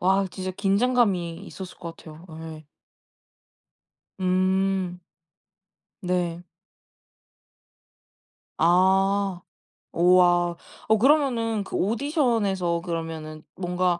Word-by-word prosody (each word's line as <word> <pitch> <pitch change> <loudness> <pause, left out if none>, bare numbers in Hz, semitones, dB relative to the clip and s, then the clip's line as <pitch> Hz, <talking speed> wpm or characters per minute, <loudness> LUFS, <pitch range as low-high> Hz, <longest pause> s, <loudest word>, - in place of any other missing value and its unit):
와우 190 +1 +2
진짜 185 0 -5
긴장감이 200 -3 +1
있었을 185 -2 -9
것 170 -2 -8
같아요. 155 +1 -13 0.3
예. 155 - -14 1.6
음. 185 0 +1 1.0
네. 180 -1 -1 2.2
아. 190 +2 +3 0.6
우와. 175 0 +4 0.3
어 220 - +4
그러면은 235 -5 +2
그 - - -7
오디션에서 215 - 0
그러면은 160 -2 -5
뭔가 180 -1 0
185 Hz, 165 characters per minute, -25 LUFS, 175-200 Hz, 2.2 s, 우와